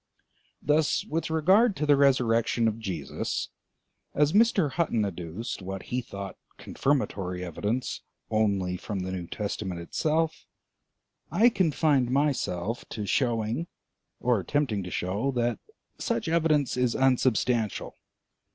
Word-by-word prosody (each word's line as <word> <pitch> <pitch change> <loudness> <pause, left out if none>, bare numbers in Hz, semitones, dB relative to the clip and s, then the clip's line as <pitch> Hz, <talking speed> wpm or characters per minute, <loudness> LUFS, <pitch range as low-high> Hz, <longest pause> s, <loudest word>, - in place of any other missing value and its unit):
Thus 150 +2 +2
with 165 +2 -2
regard 190 +8 +4
to 150 - -1
the 145 -1 +5
resurrection 120 -4 +3
of 110 0 -1
Jesus, 85 -10 -3 0.7
as 150 +2 +3
Mr. 205 -8 +4
Hutton 130 -9 +1
adduced 90 +4 -5
what 95 0 -5
he 125 - +1
thought 100 -4 -7 0.2
confirmatory 95 -10 -1
evidence 105 +9 -2 0.3
only 100 -4 +1
from 100 0 -4
the 95 +1 -4
New 90 -2 -4
Testament 100 -3 -4
itself, 155 - -1 0.8
I 235 +3 +5
confined 155 - +2
myself 125 -7 0
to 105 - -4
showing 115 - 0 0.5
or 125 -3 +2
attempting 120 -1 0
to - - -5
show 100 +10 -1
that 120 -1 0 0.4
such 235 -7 -1
evidence 155 -4 +2
is 125 -2 +1
unsubstantial. 125 -4 +1
120 Hz, 120 wpm, -27 LUFS, 100-150 Hz, 0.8 s, the